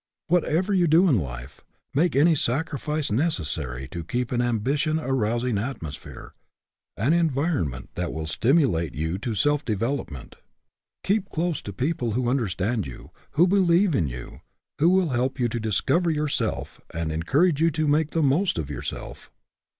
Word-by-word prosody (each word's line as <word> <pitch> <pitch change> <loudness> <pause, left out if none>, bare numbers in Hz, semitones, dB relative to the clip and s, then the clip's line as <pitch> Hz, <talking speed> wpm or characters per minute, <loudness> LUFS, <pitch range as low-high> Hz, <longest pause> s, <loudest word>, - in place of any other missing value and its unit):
Whatever 180 +3 +2
you 180 -3 +3
do 165 +5 +5
in 130 - +4
life, 60 -4 -7 0.3
make 160 +2 +2
any 160 +5 +5
sacrifice 150 +1 -1
necessary 80 - -1
to 85 +1 -5
keep 120 +8 -2
in 120 - +1
an 120 - +1
ambition 140 +7 0
arousing 120 -4 0
atmosphere, 90 - -7 0.6
an 125 +10 +2
environment 145 - 0
that 90 -1 -3
will 80 0 -4
stimulate 110 - +1
you 80 +5 -2
to 110 +1 -3
self 145 +9 +2
development. 115 - -3 0.7
Keep 200 0 0
close 165 -1 -1
to 100 - -7
peo 130 - 0
ple 120 -7 -3
who 120 +1 0
understand 105 - -1
you, 65 - -11 0.2
who 170 - +5
believe 185 -1 +3
in 85 - +1
you, 60 -1 -8 0.4
who 160 +4 +5
will 185 -2 +3
help 130 +1 -1
you 120 - +2
to 120 - -3
discover 110 - +1
yourself 150 -2 -2
and 85 -1 -3
encourage 140 - +2
you 165 - +5
to 155 -1 -1
make 150 +1 +2
the 165 0 0
most 150 - +2
of 75 -3 -3
yourself. - - -7
130 Hz, 160 wpm, -25 LUFS, 95-160 Hz, 0.7 s, do